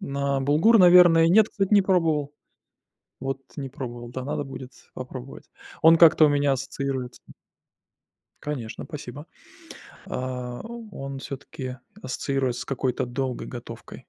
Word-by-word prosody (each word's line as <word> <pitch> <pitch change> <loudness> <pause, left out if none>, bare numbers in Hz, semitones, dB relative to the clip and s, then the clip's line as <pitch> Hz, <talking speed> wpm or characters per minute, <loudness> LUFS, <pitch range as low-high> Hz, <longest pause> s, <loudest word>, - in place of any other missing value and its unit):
На 140 0 -2
булгур, 155 - +4
наверное, 175 -2 +7
нет, 215 +4 +5
кстати, 195 -1 -1
не 200 - +6
пробовал. 160 -6 +1 0.9
Вот 135 +1 -3 0.2
не 135 -2 -5
пробовал, 120 -3 -7
да, 130 +1 -6
надо 145 0 -3
будет 130 -1 -9 0.2
попробовать. 130 +1 -8 0.4
Он 165 +1 +7
как-то 160 -1 +7
у - - +4
меня 145 -1 +2
ассоциируется 135 -1 -4 1.2
Конечно, 130 -7 -5
спасибо. 145 -1 -9 0.8
А 125 -1 -5 0.3
он 135 -4 -7
всё-таки 130 -2 -7 0.3
ассоциируется 130 -1 -2
с - - -8
какой-то 130 -1 -2
долгой 125 +1 -4
готовкой, 120 -2 -10
135 Hz, 125 wpm, -25 LUFS, 130-150 Hz, 1.2 s, наверное